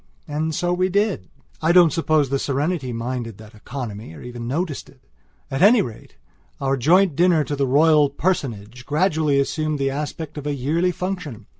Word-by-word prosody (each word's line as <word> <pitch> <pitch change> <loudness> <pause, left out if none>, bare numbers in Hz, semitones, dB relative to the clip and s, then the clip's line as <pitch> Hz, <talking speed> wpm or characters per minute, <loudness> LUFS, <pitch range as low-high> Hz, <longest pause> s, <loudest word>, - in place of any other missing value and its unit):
And 155 +1 -2
so 175 0 0
we 185 +1 +1
did. 200 - 0 0.3
I 160 +1 +3
don't 175 -4 +6
suppose 155 -4 +1
the 135 0 0
Serenity 140 0 -1
minded 115 -2 -4
that 110 0 -14
economy, 110 - -7
or - - -11
even 120 -1 -7
noticed 155 +3 -3
it. 130 - -22 0.5
At 135 - -2
any 210 +2 +6
rate, 115 -8 -10 0.4
our 135 0 +1
joint 170 +6 +3
dinner 170 -2 +3
to 145 - -3
the 140 -1 0
Royal 150 +2 +4
Personage 125 - -3
gradually 155 -3 +2
assumed 155 +2 -1
the 135 -1 0
aspect 150 +2 -5
of 150 - -6
a 145 - -1
yearly 160 +7 0
function. 180 - -5
145 Hz, 175 wpm, -22 LUFS, 130-170 Hz, 0.5 s, don't